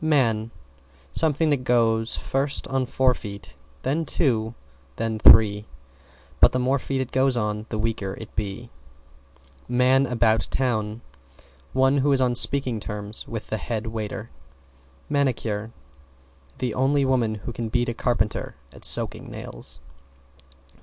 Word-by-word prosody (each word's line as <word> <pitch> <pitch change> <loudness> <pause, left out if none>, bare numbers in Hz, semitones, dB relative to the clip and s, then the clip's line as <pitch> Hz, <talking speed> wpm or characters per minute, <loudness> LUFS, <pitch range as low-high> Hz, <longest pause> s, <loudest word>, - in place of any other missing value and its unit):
=MAN= 115 -8 +2 0.6
Something 155 0 +1
that 145 - +3
"Goes 115 -2 +2
first 135 +1 -2
on 130 -1 0
four 130 0 +2
feet, 100 - -9 0.3
then 150 +5 0
two 130 -8 +1
feet, 70 - -16
then 110 -1 -2
three, 105 -1 +6 0.7
but - - +6
the - - +1
more 130 +2 +1
feet 135 0 -2
it 130 - -5
goes 130 -1 +2
on 105 -1 -2
the 110 - -3
weaker 105 -3 -2
it 110 - -11
be!" 105 +3 -4 1.0
=MAN 130 +2 +3
ABOUT 115 -2 +2
TOWN= 110 -4 -1 0.7
One 135 +2 +3
who 145 +2 +2
is 135 - +3
on 125 -1 +2
speaking 125 -2 +3
terms 105 +1 -5
with 115 -2 -7
the 110 - 0
head 110 +1 -4
waiter. 110 0 -5 0.8
=MANICURE= 115 -7 -1 0.9
The 125 -3 -2
only 135 +3 +2
woman 120 -5 +1
who 110 +3 -7
can 115 -1 -4
beat 120 +2 0
a 120 - -1
carpenter 110 -3 -1 0.2
at - - -14
soaking - - +2
nails. - - -10
120 Hz, 140 wpm, -24 LUFS, 110-130 Hz, 1.0 s, three